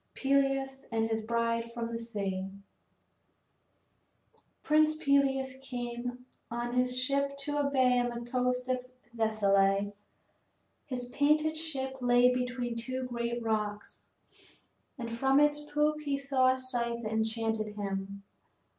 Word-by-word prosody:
PELEUS 270 -1 +1
AND 225 0 +1
HIS 225 0 0
BRIDE 230 +1 -1
FROM 235 0 -3
THE 230 0 -4
SEA 200 -4 -3
I - - -13 2.1
Prince 310 0 +4
Peleus 275 -3 +2
came 245 -1 -5 0.2
on 240 +1 -3
his 250 0 +2
ship 280 +1 0
to 290 +1 -2
a 285 -1 +1
bay 255 -2 +3
on 245 0 +1
the 240 0 -6
coast 250 0 0
of 255 -1 -1 0.3
Thessaly. 200 -2 +2 0.9
His 250 -2 -3
painted 305 +4 +2
ship 270 -5 -4
lay 245 0 +5
between 250 -1 -2
two 255 +3 -3
great 235 -1 -3
rocks, 210 -2 -3 0.9
and 240 -2 -4
from 265 +4 +2
its 295 0 +4
poop 300 +1 0
he 285 -2 -1
saw 270 -2 +3
a 260 - -1
sight 235 -2 -2
that 215 0 -3
enchanted 220 -1 -1
him. 200 -1 -4
245 Hz, 130 wpm, -31 LUFS, 230-270 Hz, 2.1 s, lay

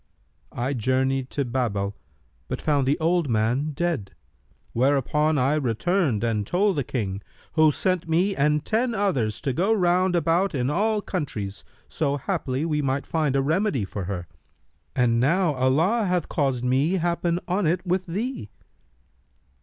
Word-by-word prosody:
I 125 +4 -1
journeyed 130 +2 0
to 140 - -2
Babel, 105 -5 -1 0.5
but - - -3
found 145 -4 +1
the 145 +3 +2
old 165 -2 +1
man 120 +6 +1
dead; 165 - -2 0.6
whereupon 145 +4 +2
I 135 +2 +2
returned 145 - 0
and 110 -3 0
told 195 +2 +2
the 140 - +1
King, 100 -6 -3 0.3
who 155 -1 +5
sent 180 +1 -1
me 185 +5 +2
and 150 +1 +1
ten 230 +2 0
others 135 - 0
to 135 - -1
go 190 - +1
round 180 -2 +2
about 170 +2 +1
in 130 +1 0
all 210 +5 +1
countries, 105 - -4 0.2
so 145 -3 -1
haply 145 -3 -2
we 150 -2 0
might 135 0 -1
find 155 -4 0
a 135 - +2
remedy 155 - +1
for 95 0 -5
her: 90 -2 -4 0.7
and 120 -2 +2
now 165 +6 +2
Allah 155 - +2
hath 180 -3 0
caused 135 -5 0
me 135 +7 +2
happen 170 -1 0
on 185 0 +1
it 175 +4 0
with 185 +1 0
thee.' 210 - -4
150 Hz, 155 wpm, -24 LUFS, 130-180 Hz, 0.7 s, who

